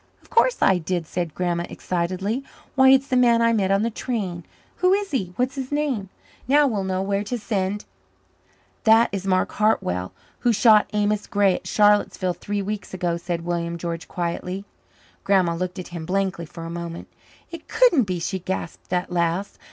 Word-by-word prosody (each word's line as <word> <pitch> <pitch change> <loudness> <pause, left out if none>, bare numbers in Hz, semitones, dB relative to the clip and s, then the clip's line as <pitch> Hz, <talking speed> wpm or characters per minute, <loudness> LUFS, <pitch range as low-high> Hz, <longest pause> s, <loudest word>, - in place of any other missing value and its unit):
"Of - - -24
course - - +3
I 190 -2 +4
did," 175 0 -2
said 170 -1 -4
Grandma 175 -1 -1
excitedly. 185 +8 -2 0.3
"Why, 265 0 +6
it's 270 +1 +5
the 255 - 0
man 240 -2 +5
I 230 0 +3
met 200 -4 +1
on 195 +2 +2
the 230 - 0
train. 200 -8 -3 0.3
Who 365 +1 +3
is 400 -1 -1
he? 195 -11 -1
What 250 +1 +1
is 275 - -17
his 265 0 -4
name? 280 -10 -1 0.4
Now, 290 +2 +5
we'll 215 -8 0
know 190 0 -1
where 200 +1 0
to 245 +4 -2
send 200 -1 -2 0.5
" 95 +1 -37
"That 225 +1 +6
is 195 -1 -4
Mark 185 -1 +2
Hartwell, 95 - 0 0.3
who 240 - +2
shot 215 0 +5
Amos 210 0 0
Gray 200 -2 +3
at - - -5
Charlotteville 205 -3 +3
three 200 +3 -3
weeks 205 -1 -5
ago," 175 -2 -1
said 170 -1 -4
William 170 -1 -2
George 170 0 -5
quietly. 180 +2 -4 0.6
Grandma 185 -4 +3
looked 180 +3 -4
at 185 - -7
him 170 -2 -7
blankly 190 -3 -1
for 165 - -9
a - - -6
moment. 170 0 -6 0.4
"It 335 -2 -9
couldn't 410 - +4
be," 180 -2 -2
she 190 +3 -2
gasped 185 -2 -5
at 180 0 -1
last. 175 +3 -1
195 Hz, 190 wpm, -23 LUFS, 175-225 Hz, 0.6 s, Why